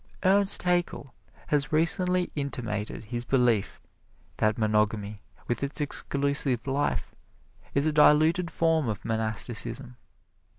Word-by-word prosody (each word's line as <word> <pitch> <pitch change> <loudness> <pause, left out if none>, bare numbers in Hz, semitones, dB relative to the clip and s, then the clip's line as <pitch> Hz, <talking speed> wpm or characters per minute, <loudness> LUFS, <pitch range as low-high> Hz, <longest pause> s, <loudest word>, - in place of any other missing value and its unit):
Ernst 200 +1 +4
Haeckel 175 -6 -1 0.4
has 145 -2 0
recently 180 +3 +2
intimated 115 -9 -4
his 120 +2 -4
belief 120 -5 +1 0.6
that 110 0 +1
monogamy, 105 -1 -1 0.3
with 120 - -2
its 140 +1 -3
exclusive 140 -3 +1
life, 140 +1 -2 0.6
is 140 +1 +2
a 155 - +2
diluted 155 +4 +4
form 165 -4 +1
of 105 -4 -5
monasticism. 115 +3 -2
135 Hz, 110 wpm, -27 LUFS, 110-155 Hz, 0.6 s, Ernst